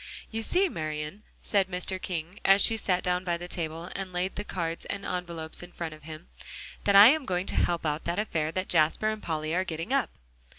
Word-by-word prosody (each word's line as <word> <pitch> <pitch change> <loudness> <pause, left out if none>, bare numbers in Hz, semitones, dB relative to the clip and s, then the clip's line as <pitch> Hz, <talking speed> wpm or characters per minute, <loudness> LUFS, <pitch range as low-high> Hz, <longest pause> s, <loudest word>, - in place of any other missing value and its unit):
"You 225 0 -2
see, 365 - +3
Marian," 155 - -4 0.2
said 200 -2 +2
Mr. 185 0 -3
King 175 +1 -4
as 195 +1 +6
she 225 - +5
sat 185 -4 0
down 180 0 0
by 175 -2 0
the 175 +1 -7
table, 165 0 -4
and 195 -1 -4
laid 180 +1 -2
the 205 - -3
cards 170 -5 -3
and 200 0 -5
envelopes 170 -3 -3
in 175 0 -10
front 170 -2 -5
of 155 - -13
him, 155 +2 -10 0.6
"that 200 - +4
I'm 250 +10 +9
going 180 -6 -1
to - - -2
help 170 -1 +1
out 150 +1 -1
that 170 +1 -1
affair 160 -7 -1
that 185 +3 -2
Jasper 165 +6 +3
and 215 -1 -6
Polly 155 -1 -2
are 185 +2 +2
getting 165 +6 -4
up." 275 -3 +2
180 Hz, 215 wpm, -28 LUFS, 165-195 Hz, 0.6 s, I'm